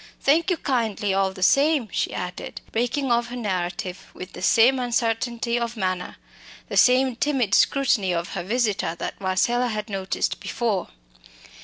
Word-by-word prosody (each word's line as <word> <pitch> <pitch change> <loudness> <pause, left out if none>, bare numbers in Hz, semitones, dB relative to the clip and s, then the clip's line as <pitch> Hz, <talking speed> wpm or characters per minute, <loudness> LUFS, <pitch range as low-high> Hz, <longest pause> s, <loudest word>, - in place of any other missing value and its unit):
Thank 320 +6 +2
you 360 - +1
kindly, 220 -8 -1
all 195 0 +1
the 185 -1 -5
same," 280 - +3
she - - -1
added, 180 0 -6
breaking 245 +3 -1
off 235 0 +2
her 245 - -7
narrative 185 -4 -3
with 185 - -9
the - - -9
same 235 +8 +4
uncertainty 235 0 -1
of 235 0 -4
manner, 185 -3 -2 0.5
the - - -4
same 255 0 +4
timid 250 -6 0
scrutiny 250 -9 +3
of 170 0 -2
her 190 - -4
visitor 210 -3 -1
that - - -6
Marcella 235 +7 +1
had 215 -1 -4
noticed 195 -1 -2
before. 225 -6 -2
230 Hz, 155 wpm, -24 LUFS, 190-250 Hz, 0.5 s, same